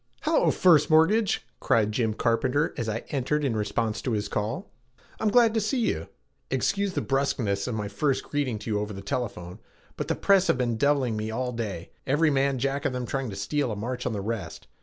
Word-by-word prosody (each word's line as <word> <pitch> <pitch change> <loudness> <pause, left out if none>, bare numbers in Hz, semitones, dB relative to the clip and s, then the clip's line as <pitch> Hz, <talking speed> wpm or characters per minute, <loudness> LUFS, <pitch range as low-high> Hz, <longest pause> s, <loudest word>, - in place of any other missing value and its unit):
"Hello, - - +3
First 165 -6 +5
Mortgage!" 180 +7 +3
cried 105 -2 +2
Jim 110 -1 0
Carpenter 130 +8 +1
as 115 -2 -3
I 110 +1 -3
entered 145 +2 0
in 125 -5 0
response 110 +1 -1
to 125 - -2
his 105 -1 -1
call. 110 - -3 0.5
"I'm 215 - +2
glad 230 0 +5
to 225 - +1
see 215 +6 0
you. 235 - -1 0.4
Excuse 200 -1 0
the - - -1
bruskness 120 -8 0
of 125 - -2
my 105 -2 -2
first 130 +7 0
greeting 140 -6 -2
to 110 - -5
you 105 - +1
over 105 0 -4
the 100 0 -8
telephone, 90 -7 -4 0.4
but - - -3
the - - 0
press 195 -1 +4
have - - +3
been 120 -2 0
deviling 135 -2 +2
me 110 0 -3
all 125 +3 -2
day, 105 -8 -5 0.2
every 150 +3 +3
man 135 -1 +2
jack 135 +2 -1
of 130 - +1
them 125 -1 -3
trying 135 0 -2
to 100 - -6
steal 120 +7 -1
a - - -3
march 125 +4 -3
on 120 - -1
the 100 - -3
rest. 110 0 -5
125 Hz, 215 wpm, -26 LUFS, 110-145 Hz, 0.5 s, First